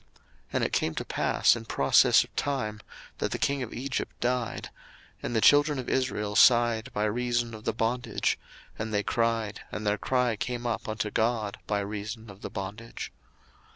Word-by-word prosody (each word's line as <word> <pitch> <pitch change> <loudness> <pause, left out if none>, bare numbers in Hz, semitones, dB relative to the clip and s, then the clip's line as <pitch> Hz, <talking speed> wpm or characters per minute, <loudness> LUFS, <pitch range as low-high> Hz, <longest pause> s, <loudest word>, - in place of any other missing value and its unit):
02:002:023 - - -35 0.4
And - - +1
it - - -1
came 80 - +1
to - - -3
pass - - +3
in 115 -1 -7
process 70 -9 +5
of - - -18
time, 120 -7 -2 0.4
that - - 0
the - - -2
king 140 -1 0
of 125 - -4
Egypt 130 +1 -4
died: 125 -1 -1 0.5
and 120 - -3
the 110 - +3
children 145 +2 +5
of 130 - -4
Israel 105 -6 -1
sighed 120 -2 +5
by 105 - -1
reason 120 +1 0
of 110 0 -9
the - - +2
bondage, 120 +2 0 0.4
and 110 0 -3
they 105 -1 +1
cried, 115 -2 0
and 105 0 -5
their 105 0 +1
cry 125 -3 +1
came 120 +3 -4
up 115 -2 -2
unto 110 -1 -2
God 110 -3 0
by 105 -1 0
reason 105 +2 -5
of 95 - -15
the - - -5
bondage. 100 +4 -6
115 Hz, 185 wpm, -28 LUFS, 105-125 Hz, 0.5 s, process